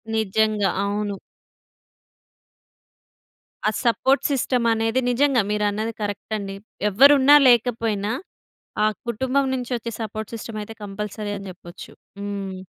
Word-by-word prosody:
నిజంగా. 215 Hz, -1 st, +1 dB
అవును. 205 Hz, 0 st, -2 dB, 2.5 s
ఆ -, -, +5 dB
సపోర్ట్ 265 Hz, +3 st, +2 dB
సిస్టమ్ 250 Hz, -2 st, 0 dB
అనేది 225 Hz, +3 st, 0 dB
నిజంగా 265 Hz, 0 st, +3 dB
మీరన్నది 210 Hz, +2 st, -1 dB
కరెక్ట్ 205 Hz, +1 st, -4 dB
అండి. 195 Hz, -1 st, -6 dB, 0.3 s
ఎవరు 270 Hz, +9 st, +7 dB
ఉన్నా 280 Hz, +2 st, +7 dB
లేకపోయినా 225 Hz, -4 st, +2 dB, 0.7 s
ఆ -, -, +5 dB, 0.2 s
కుటుంబం 260 Hz, +4 st, 0 dB
నుంచి 250 Hz, -1 st, -4 dB
వచ్చే 230 Hz, 0 st, -6 dB
సపోర్ట్ 220 Hz, +1 st, -5 dB
సిస్టమయితే 220 Hz, -1 st, -6 dB
కంపల్సరీ 205 Hz, +1 st, -5 dB
అని 195 Hz, -, -9 dB
జెప్పొచ్చు. 175 Hz, 0 st, -12 dB, 0.3 s
హ్మ్. 200 Hz, -2 st, -5 dB
220 Hz, 110 wpm, -23 LUFS, 205-240 Hz, 2.5 s, ఎవరు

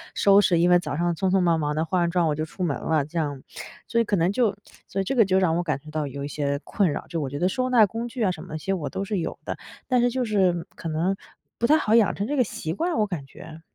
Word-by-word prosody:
收 200 Hz, 0 st, +5 dB
拾。 175 Hz, -4 st, +3 dB
因 175 Hz, +1 st, +4 dB
为 180 Hz, 0 st, +6 dB
早 150 Hz, -4 st, -4 dB
上 175 Hz, 0 st, 0 dB
匆 190 Hz, +3 st, 0 dB
匆 190 Hz, +1 st, +3 dB
忙 170 Hz, -3 st, +2 dB
忙 150 Hz, -1 st, -1 dB
地 160 Hz, +1 st, 0 dB
化 180 Hz, +3 st, 0 dB
完 170 Hz, -1 st, +1 dB
妆 175 Hz, -1 st, +2 dB
我 150 Hz, -, +1 dB
就 155 Hz, -, -2 dB
出 180 Hz, +4 st, -6 dB
门 155 Hz, -6 st, 0 dB
了 155 Hz, -3 st, 0 dB
这 160 Hz, +4 st, -7 dB
样。 145 Hz, -4 st, -3 dB, 0.5 s
所 235 Hz, -, +1 dB
以 -, -, +3 dB
可 210 Hz, -, 0 dB
能 175 Hz, +1 st, +2 dB
就 220 Hz, -2 st, +1 dB, 0.3 s
所 195 Hz, -, -4 dB
以 -, -, -3 dB
这 270 Hz, -, -1 dB
个 230 Hz, -4 st, +5 dB
就 190 Hz, 0 st, +2 dB
让 175 Hz, -4 st, +2 dB
我 175 Hz, -, 0 dB
感 150 Hz, -5 st, -1 dB
觉 155 Hz, +2 st, -14 dB
到 155 Hz, -1 st, -2 dB
有 140 Hz, +1 st, -6 dB
一 -, -, -3 dB
些 140 Hz, -1 st, -2 dB
困 190 Hz, -6 st, +1 dB
扰。 -, -, -4 dB
就 165 Hz, -2 st, -3 dB
我 140 Hz, -, -3 dB
觉 145 Hz, +2 st, -5 dB
得 180 Hz, -, +2 dB
收 255 Hz, +5 st, -1 dB
纳 235 Hz, -4 st, +6 dB
工 225 Hz, +3 st, -4 dB
具 240 Hz, 0 st, -3 dB
啊 190 Hz, -, +3 dB
什 160 Hz, -, -7 dB
么 -, -, -10 dB
的 -, -, -8 dB
那 -, -, -2 dB
些 195 Hz, +5 st, -2 dB
我 170 Hz, -6 st, -3 dB
都 195 Hz, -, -4 dB
是 205 Hz, 0 st, -2 dB
有 165 Hz, -, -4 dB
的， -, -, -4 dB, 0.3 s
但 250 Hz, -2 st, +3 dB
是 245 Hz, -, +3 dB
就 250 Hz, +1 st, -1 dB
是 185 Hz, -6 st, +1 dB
可 165 Hz, -, -6 dB
能 165 Hz, +5 st, 0 dB, 0.4 s
不 235 Hz, -, 0 dB
太 310 Hz, -, +6 dB
好 220 Hz, -7 st, +2 dB
养 225 Hz, -3 st, +4 dB
成 200 Hz, -, -2 dB
这 290 Hz, -, -1 dB
个 255 Hz, -, +5 dB
习 160 Hz, -7 st, -4 dB
惯， 335 Hz, -, -1 dB
我 215 Hz, -1 st, +2 dB
感 170 Hz, -8 st, -5 dB
觉。 155 Hz, +3 st, -12 dB
180 Hz, 340 characters per minute, -25 LUFS, 155-210 Hz, 0.5 s, 为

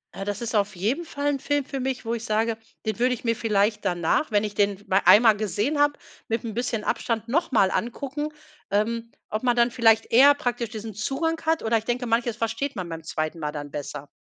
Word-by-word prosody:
Äh, 195 Hz, -, -5 dB
das 205 Hz, +3 st, -3 dB
ist 230 Hz, -1 st, -3 dB
auf 205 Hz, 0 st, +1 dB
jeden 225 Hz, -, -1 dB
Fall 285 Hz, -2 st, -3 dB
'n 280 Hz, -2 st, -1 dB
Film 290 Hz, 0 st, 0 dB
für 275 Hz, -, -5 dB
mich, 260 Hz, -2 st, -3 dB
wo 230 Hz, -, -1 dB
ich 230 Hz, -1 st, -4 dB
sage, 220 Hz, 0 st, 0 dB, 0.3 s
den 220 Hz, -1 st, -2 dB
würde 250 Hz, +1 st, +3 dB
ich 250 Hz, -, -7 dB
mir 230 Hz, -1 st, +1 dB
vielleicht 210 Hz, -2 st, +1 dB
danach, 175 Hz, -, +1 dB
wenn 205 Hz, 0 st, +3 dB
ich 210 Hz, -1 st, -3 dB
den 200 Hz, -1 st, +1 dB
m -, -, -1 dB
einmal 220 Hz, 0 st, +7 dB
gesehen 215 Hz, -, -1 dB
habe, 290 Hz, 0 st, +4 dB, 0.3 s
mit 225 Hz, 0 st, -1 dB
’n 225 Hz, -3 st, -5 dB
bisschen 235 Hz, -2 st, -2 dB
Abstand 230 Hz, -1 st, -1 dB
noch 295 Hz, +5 st, 0 dB
mal 195 Hz, -5 st, +4 dB
angucken, 280 Hz, +5 st, -3 dB, 0.4 s
ähm, 230 Hz, +3 st, 0 dB, 0.2 s
ob 215 Hz, +2 st, -3 dB
man 245 Hz, -1 st, +3 dB
dann 240 Hz, 0 st, +3 dB
vielleicht 225 Hz, -2 st, +3 dB
eher 275 Hz, +5 st, +8 dB
praktisch 245 Hz, -5 st, -2 dB
diesen 220 Hz, 0 st, -7 dB
Zugang 295 Hz, -, -2 dB
hat 320 Hz, 0 st, +1 dB
oder 225 Hz, +1 st, +2 dB
ich 220 Hz, -, -5 dB
denke, 245 Hz, +1 st, -1 dB
manches 230 Hz, 0 st, 0 dB
versteht 260 Hz, +5 st, -2 dB
man 185 Hz, -3 st, -4 dB
beim 165 Hz, -1 st, -6 dB
2. 155 Hz, 0 st, -3 dB
Mal 150 Hz, -1 st, -2 dB
dann 145 Hz, -1 st, -7 dB
besser. 145 Hz, 0 st, -6 dB
230 Hz, 230 wpm, -25 LUFS, 205-250 Hz, 0.4 s, eher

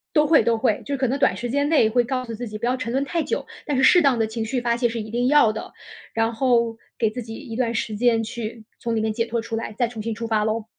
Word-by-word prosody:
都 300 Hz, -1 st, +5 dB
会， 315 Hz, 0 st, +5 dB
都 230 Hz, -1 st, +2 dB
会， 220 Hz, -3 st, +1 dB
就 280 Hz, -1 st, -2 dB
可 260 Hz, -, +1 dB
能 260 Hz, +3 st, 0 dB
短 235 Hz, -9 st, +3 dB
时 240 Hz, +3 st, -4 dB
间 285 Hz, +3 st, +1 dB
内 290 Hz, -9 st, +4 dB
会 240 Hz, +2 st, +3 dB
告 255 Hz, +1 st, -2 dB
诉 230 Hz, -, -6 dB
自 235 Hz, +2 st, -5 dB
己 215 Hz, -, -6 dB
不 230 Hz, -, -3 dB
要 250 Hz, +1 st, +1 dB
沉 255 Hz, -3 st, -4 dB
沦 270 Hz, +3 st, +1 dB
太 330 Hz, +2 st, -1 dB
久， 470 Hz, -, -2 dB, 0.2 s
但 290 Hz, -4 st, -1 dB
是 265 Hz, -, +2 dB
适 355 Hz, +6 st, +7 dB
当 275 Hz, -6 st, +3 dB
的 220 Hz, -, +2 dB
情 225 Hz, +1 st, -4 dB
绪 250 Hz, +3 st, -1 dB
发 235 Hz, -1 st, +1 dB
泄 240 Hz, 0 st, +1 dB
是 230 Hz, 0 st, -4 dB
一 215 Hz, -, -8 dB
定 240 Hz, +2 st, 0 dB
要 290 Hz, -6 st, +5 dB
的， 220 Hz, -, -7 dB, 0.4 s
然 225 Hz, +1 st, +1 dB
后 235 Hz, -2 st, +2 dB, 0.2 s
给 220 Hz, -, +2 dB
自 245 Hz, +3 st, -6 dB
己 225 Hz, 0 st, -8 dB
一 245 Hz, -6 st, -8 dB
段 235 Hz, -1 st, 0 dB
时 220 Hz, -1 st, -2 dB
间 230 Hz, 0 st, +2 dB
去 225 Hz, 0 st, -6 dB, 0.2 s
从 230 Hz, -1 st, -2 dB
里 220 Hz, -, +1 dB
面 220 Hz, 0 st, 0 dB
解 230 Hz, +1 st, 0 dB
脱 235 Hz, 0 st, -2 dB
出 225 Hz, -, -5 dB
来， 225 Hz, -1 st, -4 dB
再 240 Hz, -, +2 dB
重 225 Hz, -2 st, -7 dB
新 225 Hz, +1 st, -3 dB
出 230 Hz, +1 st, -5 dB
发 220 Hz, -2 st, +1 dB
喽。 220 Hz, 0 st, -1 dB
235 Hz, 330 characters per minute, -23 LUFS, 225-255 Hz, 0.4 s, 适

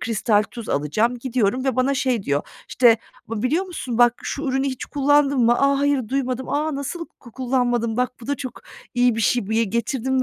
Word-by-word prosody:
kristal 215 Hz, -2 st, +1 dB
tuz 235 Hz, -3 st, -8 dB
alacağım, 215 Hz, +13 st, 0 dB
gidiyorum 250 Hz, -1 st, 0 dB
ve 265 Hz, -3 st, 0 dB
bana 260 Hz, +2 st, +2 dB
şey 255 Hz, -5 st, 0 dB
diyor, 145 Hz, -4 st, 0 dB, 0.3 s
işte, 235 Hz, -3 st, +5 dB, 0.3 s
"bı 220 Hz, 0 st, -4 dB
biliyor 315 Hz, +9 st, +1 dB
musun 260 Hz, -10 st, -5 dB
bak 240 Hz, -1 st, +5 dB
şu 280 Hz, -, -4 dB
ürünü 270 Hz, -1 st, 0 dB
hiç 260 Hz, -2 st, -3 dB
kullandın 285 Hz, -1 st, +2 dB
mı? 240 Hz, 0 st, +4 dB
A, 275 Hz, 0 st, +3 dB
hayır, 285 Hz, -5 st, +1 dB
duymadım. 260 Hz, -1 st, -2 dB
A 300 Hz, +1 st, -1 dB
nasıl 285 Hz, +5 st, -4 dB
ku 235 Hz, -, -14 dB
kullanmadın? 245 Hz, -3 st, 0 dB
Bak 250 Hz, 0 st, 0 dB
bu 230 Hz, -, -10 dB
da 285 Hz, -, 0 dB
çok 255 Hz, -1 st, -7 dB, 0.3 s
iyi 245 Hz, -1 st, +3 dB
bir -, -, -1 dB
şey, 225 Hz, -2 st, +1 dB
bir 220 Hz, -, +1 dB
ye 230 Hz, -, +3 dB
getirdim 240 Hz, +4 st, -1 dB
250 Hz, 205 wpm, -22 LUFS, 230-275 Hz, 0.3 s, işte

